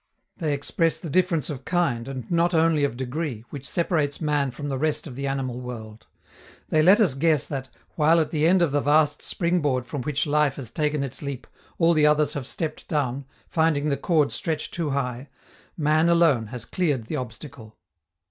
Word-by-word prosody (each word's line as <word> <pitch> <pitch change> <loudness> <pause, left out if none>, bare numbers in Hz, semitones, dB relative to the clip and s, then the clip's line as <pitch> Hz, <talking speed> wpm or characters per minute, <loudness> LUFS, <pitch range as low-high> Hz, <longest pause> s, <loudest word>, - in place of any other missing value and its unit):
They 155 -5 -1
express 165 +3 0
the 165 - -7
difference 170 -4 +1
of 135 -2 -7
kind, 135 -10 0
and 130 -4 -7
not 170 +1 +2
only 160 -2 +3
of 135 -4 -1
degree, 130 -2 -4
which 140 -1 -6
separates 155 -4 0
man 150 -3 +1
from 145 +4 -6
the 135 -2 -2
rest 155 +1 0
of 135 -6 -8
the 140 +1 -3
animal 130 -2 -3
world. 110 -3 -9 0.6
They 155 - +3
let 190 +7 +6
us 190 - +3
guess 155 +1 +2
that, 135 -2 -5 0.2
while 160 - +4
at 155 - 0
the 155 0 +2
end 180 0 +4
of 165 - +1
the 145 0 +1
vast 150 +1 +3
spring 175 0 0
board 130 -4 0
from 140 +1 -5
which 145 +2 -1
life 150 -2 +2
has 125 -5 -7
taken 150 -1 0
its 135 - -5
leap, 140 -3 -5 0.3
all 170 0 +4
the 150 -2 +4
others 150 -1 +3
have 135 -4 -4
stepped 155 +2 -4
down, 140 -3 -1 0.2
finding 155 -2 +1
the 140 - +1
cord 150 -2 +1
stretched 155 -2 -3
too 165 -3 -2
high, 135 -1 -3 0.5
man 155 +1 +3
alone 165 -10 +3
has 120 0 -7
cleared 145 -10 -1
the 150 - -3
obstacle. 125 -2 -8
145 Hz, 195 wpm, -24 LUFS, 130-160 Hz, 0.6 s, let